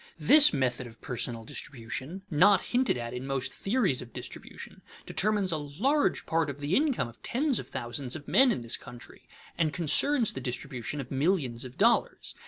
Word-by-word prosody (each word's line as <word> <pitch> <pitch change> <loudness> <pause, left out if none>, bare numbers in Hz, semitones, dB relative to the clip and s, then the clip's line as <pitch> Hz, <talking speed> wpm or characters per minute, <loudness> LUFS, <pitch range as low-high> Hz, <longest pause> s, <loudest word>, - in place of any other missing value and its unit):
This 300 0 +7
method 130 -2 -1
of 115 -1 -15
personal 120 -2 -5
distribution, 135 - -7
not 190 +5 +5
hinted 250 - +1
at 120 0 -5
in 125 +2 -6
most 135 -1 -2
theories 195 - 0
of 120 - -11
distribution, - - -9 0.2
determines 205 -3 0
a 160 - 0
large 205 - 0
part 165 -2 0
of 140 0 -7
the 145 +5 -1
income 275 - +1
of 115 - -15
tens 270 +1 0
of - - -8
thousands 120 +2 -4
of 150 -2 -9
men 265 -1 +5
in 125 - -2
this 115 0 0
country 120 -1 -13 0.3
and 160 -2 +2
concerns 215 - +3
the 130 - -6
distribution 125 +1 -4
of 130 - -11
millions 135 -5 0
of 125 +2 -11
dollars. 235 +3 +1
145 Hz, 180 wpm, -28 LUFS, 125-205 Hz, 0.3 s, This